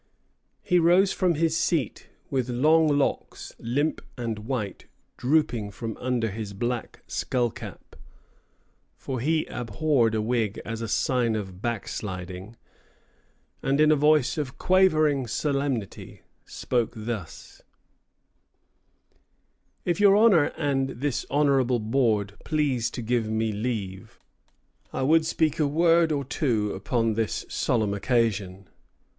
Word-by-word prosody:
He 180 - +3
rose 180 +4 +4
from 180 -3 +1
his 160 +1 +1
seat 160 - -1 0.2
with 130 -2 -1
long 155 +6 +4
locks, 145 -2 -1
limp 145 +7 -1 0.2
and 115 -3 -3
white, 105 -3 -4 0.3
drooping 125 -6 +1
from 110 +2 -6
under 120 -3 -1
his 105 0 -6
black 120 +4 -4
skullcap, 120 -3 -3 1.0
for 130 -2 -4
he 155 +5 +1
abhorred 120 0 0
a 110 - +1
wig 110 -2 -1
as 115 0 -5
a 115 - -3
sign 120 +1 +1
of 95 -3 -6
backsliding, 95 -3 -5 1.1
and 135 +2 0
in 155 0 +5
a - - +5
voice 150 0 +3
of 135 -4 -4
quavering 155 -8 +3
solemnity 140 -5 -3 0.2
spoke 120 -2 -2
thus: 110 -6 -7 2.2
"If 175 +2 0
your 200 -1 +6
Honour 205 -9 +6
and 135 -3 0
this 135 +1 -3
Honourable 135 -3 +2
Board 110 -3 0
please 140 -7 0
to 120 - -6
give 115 -1 0
me 110 0 0
leave, 105 -4 -4 0.7
I - - -2
would 160 +3 +3
speak 160 -2 0
a 150 - +3
Word 165 +2 +3
or 140 -2 -1
two 115 -7 0
upon 120 -6 0
this 110 0 -2
solemn 110 -4 0
Occasion. 100 -4 -1
125 Hz, 120 wpm, -26 LUFS, 110-150 Hz, 2.2 s, your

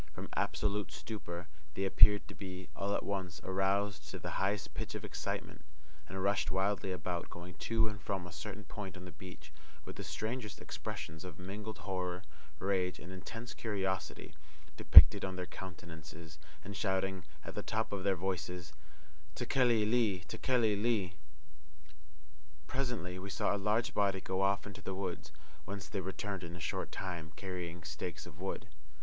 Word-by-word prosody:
From - - -6
absolute 105 -1 +1
stupor, 90 -6 -5 0.3
they 95 - +1
appeared 105 +1 +7
to - - -8
be, 95 -2 -6
all 100 +1 0
at - - 0
once, 95 -6 -2
aroused 95 +1 +1
to - - -4
the - - -4
highest 100 +1 0
pitch - - -4
of - - -4
excitement, - - -4 0.5
and 95 0 -3
rushed 100 -4 +3
wildly 95 +2 +1
about, 90 -1 -2
going 85 +1 -8 0.2
to 115 -1 +4
and 105 -2 -5
from 95 0 -2
a 90 - -8
certain 80 +8 -6
point 95 -2 -6
on 90 - -8
the 90 - -7
beach, 85 -5 -10 0.3
with - - -7
the - - -4
strangest 110 -1 -3
expressions 80 +2 -5
of 90 -4 -7
mingled 105 +4 -5
horror, 90 -1 -2 0.3
rage, 95 0 +1
and 90 +3 -8
intense 115 +6 -6
curiosity 95 -7 -2 0.4
depicted - - +11
on 95 -1 -1
their 90 -1 -2
countenances, 80 -3 -8 0.2
and 100 +1 -6
shouting, 95 -2 0 0.2
at - - -5
the 105 - -2
top 110 +1 -1
of 100 -2 -2
their 100 -1 +4
voices, 90 -2 -2 0.6
"Tekeli 120 -3 +4
li! 110 -5 +3
Tekeli 120 -5 +3
li!" 100 -4 +1 1.5
Presently 110 - -2
we 100 +2 -5
saw 100 - +2
a 100 0 -2
large 115 +2 +2
body 100 -2 +3
go 95 +1 -1
off 100 +1 +3
into 100 -2 -8
the 95 - -3
hills, 90 -5 -3 0.3
whence 100 0 -5
they 100 - -2
returned 95 0 -3
in 85 0 -6
a - - -7
short 80 - -2
time, 85 -3 -4
carrying 90 -3 -4
stakes 80 +3 -4
of - - -12
wood. - - -2
95 Hz, 165 wpm, -35 LUFS, 90-105 Hz, 1.5 s, depicted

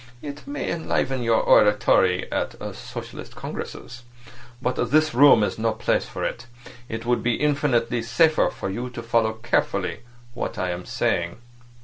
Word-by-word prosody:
It 145 - -8
may 285 0 -3
enliven 135 -5 -1
your 115 -1 +2
oratory 95 -3 +4
at - - -2 0.2
socialistic - - -9
congresses. 120 -1 -7 0.6
But 125 -1 -1
this 155 +2 +3
room 135 -3 +7
is 105 - -2
no 115 0 +1
place - - 0
for - - -6
it. 120 - -4 0.4
It 115 +1 -5
would 120 -1 +1
be 120 0 +1
infinitely 130 -5 +1
safer 155 +8 +3
for 95 - -5
you 120 +5 -4
to 120 -1 -8
follow 115 -1 +1
carefully 110 - -1 0.3
what 120 - -4
I 90 -1 -1
am 90 0 -6
saying. 85 0 -1
120 Hz, 150 wpm, -24 LUFS, 110-140 Hz, 0.6 s, room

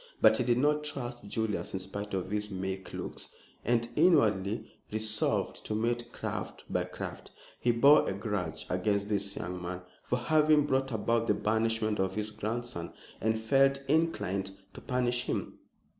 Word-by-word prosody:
But 110 0 +6
he - - +3
did 120 0 +2
not 150 +3 +2
trust 120 -6 -5
Julius 110 0 -2
in - - -1
spite 100 +2 -4
of 95 0 -3
his 105 0 -1
meek 95 -1 -4
looks, - - -5 0.3
and 120 0 +2
inwardly 110 - +3 0.3
resolved 110 0 0
to 105 - -1
meet 120 +2 -1
craft - - -5
by - - 0
craft. - - -7 0.3
He 120 - +3
bore 140 +6 +6
a - - -1
grudge 100 -5 -3
against 100 +2 0
this 100 -1 +1
young 90 0 -4
man 90 +1 -5 0.2
for 125 - -1
having 150 +3 +4
brought 135 -1 +1
about 115 +1 +1
the - - +3
banishment 110 0 +1
of 95 0 0
his 105 0 -2
grandson, 115 -4 -4 0.3
and 110 +1 +1
felt 135 +4 +4
inclined 105 - +1 0.2
to - - -10
punish 125 -1 0
him. - - -3
110 Hz, 160 wpm, -31 LUFS, 100-125 Hz, 0.3 s, But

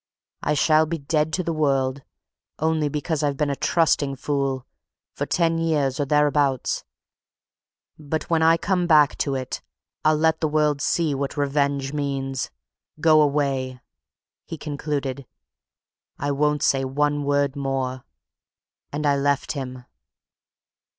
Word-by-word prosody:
'I 150 - 0
shall 155 +2 +4
be 165 +1 -2
dead 155 +1 0
to 185 - 0
the 165 - -2
world 135 -3 +1 0.6
only 155 -1 +1
because 150 +1 -2
I've 145 -2 0
been 150 -1 0
a - - -1
trusting 145 -3 +1
fool! 135 -1 -2 0.5
for - - -3
ten 165 -1 +1
years 150 -5 0
or 145 - +1
thereabouts, 145 -2 +1 1.2
but, 155 +1 -3
when 165 -1 +2
I 165 +1 +5
come 180 0 0
back 150 -3 +5
to 140 -2 0
it, 130 -1 -4 0.4
I'll 155 0 +4
let 160 +1 +2
the 160 - +2
world 150 -1 +1
see 160 -1 +1
what 140 +1 -3
revenge 140 -1 0
means! 135 -2 -2 0.5
Go 155 -1 +5
away!' 135 -3 0 0.7
he 165 - -6
concluded. 140 -3 -4 0.9
'I 145 - -1
won't 150 +1 +1
say 135 -1 +2
one 145 +2 0
word 140 -1 +1
more.' 135 -2 -2 0.9
And 150 +1 -3
I 145 -1 +4
left 140 0 0
him." 130 -3 -6
145 Hz, 135 wpm, -23 LUFS, 135-155 Hz, 1.2 s, I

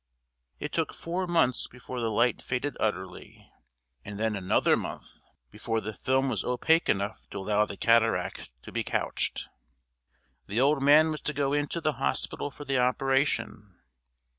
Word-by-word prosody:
It - - -5
took - - -1
four 180 +2 -3
months 165 -8 +2
before 125 0 -7
the 115 - 0
light 120 +3 +2
faded 125 +3 -2
utterly, 95 -4 -4 0.6
and 105 0 -7
then 110 -1 0
another 95 -2 +2
month - - -7 0.3
before 115 0 -2
the 110 0 -5
film 130 +5 +1
was 115 -7 -1
opaque 160 +7 +2
enough 100 +2 -1
to - - -7
allow 105 +2 +1
the 100 - -7
cataract 115 - +2
to - - -10
be - - -1
couched. - - -2 1.0
The 105 +4 -1
old 140 +2 +3
man 150 +3 +6
was 155 - -5
to 150 - -2
go 140 -1 0
into 145 +3 -1
the 155 -1 +1
hospital - - -1
for 145 +1 -11
the 135 -1 +1
operation. 130 -6 0
125 Hz, 160 wpm, -28 LUFS, 110-145 Hz, 1.0 s, man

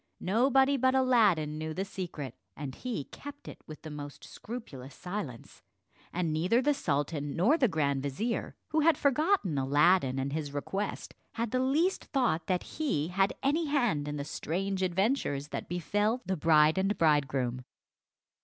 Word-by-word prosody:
Nobody 265 +7 +3
but 260 +1 +3
Aladdin 205 - +3
knew 155 0 -4
the 190 - -2
secret, 165 - -6 0.2
and 140 -2 -5
he 245 - -4
kept 285 - -11
it - - -9
with 155 - -10
the 155 - -7
most 145 -1 -8
scrupulous 145 - -8
silence; 180 - -6 0.5
and 170 -3 -1
neither 180 +9 +2
the 290 +3 +2
sultan 145 - -2
nor 205 - +4
the 275 -6 +3
grand 140 -7 0
vizier, 175 - -2
who 315 - +1
had 320 +1 +4
forgotten 280 - +2
Aladdin 145 +1 +3
and 135 +1 -2
his 150 -2 -3
request, 195 +8 -3 0.2
had 230 -2 -2
the 255 - +1
least 300 +9 +1
thought 235 - 0
that 180 -2 0
he 210 - -2
had 195 +2 +2
any 305 +5 +2
hand 240 - +1
in 150 0 -3
the 140 - -4
strange 190 +5 -2
adventures 185 - 0
that - - -5
befell 205 +7 0
the 190 +1 0
bride 155 +1 +4
and 195 +2 0
bridegroom. 135 -5 +1
180 Hz, 160 wpm, -30 LUFS, 145-245 Hz, 0.5 s, nor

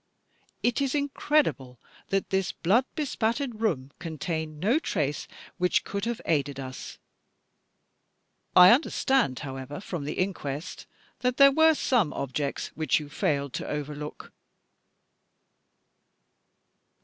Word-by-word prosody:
It 240 +2 +1
is 275 0 0
incredible 285 - 0 0.3
that 195 0 -1
this 190 -1 +1
blood 220 +9 +2
bespattered 245 -5 -1
room 140 -12 0
contained 160 -1 -4
no 230 - +2
trace 145 - -2 0.3
which 180 0 +2
could 200 +1 -3
have 235 -1 -2
aided 145 -3 0
us. 130 -1 -7 1.6
I 180 +1 +10
understand, 265 - +2
however, 135 +1 -6
from 175 -6 -5
the 150 - -3
inquest 155 -6 -4 0.3
that 250 0 0
there 275 0 +8
were 320 +2 +5
some 230 - +1
objects 140 +1 -3
which 155 -1 +1
you 150 -1 -9
failed 140 -2 -1
to - - -4
overlook?" 150 0 -6
175 Hz, 115 wpm, -27 LUFS, 145-245 Hz, 1.6 s, I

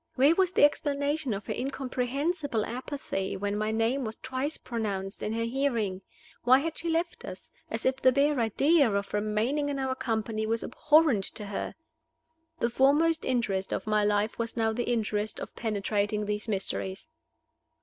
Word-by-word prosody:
Where 275 +5 +5
was 370 0 +2
the - - +4
explanation 290 -1 +2
of 200 -1 -3
her - - -2
incomprehensible 270 0 -1
apathy 250 -5 -4
when 205 +1 -2
my 215 +1 0
name 225 +5 +1
was 220 -1 -4
twice 260 +5 -3
pronounced 200 -4 -4
in 210 - -2
her 230 0 -1
hearing? 230 -6 0 0.4
Why 255 +2 +6
had 320 +3 -2
she 335 - -3
left 335 +1 -1
us, - - -9 0.2
as - - -3
if 260 0 +2
the 260 -1 +5
bare 280 +1 +2
idea 275 +4 +3
of 200 0 -2
remaining 215 +8 0
in 280 - -2
our 265 -1 0
company 220 -3 -2
was 230 +1 0
abhorrent 295 -6 +3
to 210 - -2
her? 200 0 -4 0.8
The 235 -6 0
foremost 295 +6 +3
interest 210 -7 0
of - - -2
my 215 -1 +2
life 210 +2 +1
was 230 +1 -3
now 225 -1 +2
the 240 +1 -2
interest 215 -2 -1
of - - -7
penetrating 210 -1 -1
these 210 +2 -3
mysteries. 195 +1 -3
235 Hz, 170 wpm, -29 LUFS, 210-280 Hz, 0.8 s, Why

